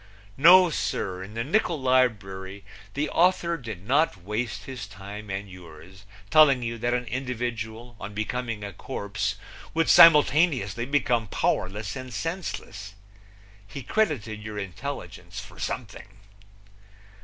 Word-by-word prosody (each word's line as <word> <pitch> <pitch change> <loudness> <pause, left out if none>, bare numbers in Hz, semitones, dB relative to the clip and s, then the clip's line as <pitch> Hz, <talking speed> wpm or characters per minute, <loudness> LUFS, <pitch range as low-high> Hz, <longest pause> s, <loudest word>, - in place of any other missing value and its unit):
No, 175 +5 +7
sir! 95 -9 -2
In 100 +3 -9
the 115 - -1
nickul 170 - +1
librury 100 -7 0 0.3
the 150 +2 0
author 170 -1 +2
did 110 - -8
not 145 -3 +2
waste 105 +3 -3
his 125 -6 -7
time 100 +2 -9
and 95 +1 -4
yours 90 +1 -13 0.3
telling 140 -5 +6
you 115 0 -4
that 120 +1 0
an 125 0 -2
individual 120 -2 -4
on 105 - -7
becoming 115 0 -3
a 100 -1 -6
corpse 100 +3 -3 0.4
would 165 0 +2
simultaneously 145 - +5
become 125 -5 +1
powerless 100 +1 -1
and 130 -1 -7
senseless. 115 - -5 0.7
He 135 +5 -8
credited 115 - -1
your 105 -1 -7
intelligence 100 +9 -6
for - - -12
something. 110 -5 -5
115 Hz, 125 wpm, -26 LUFS, 100-140 Hz, 0.7 s, No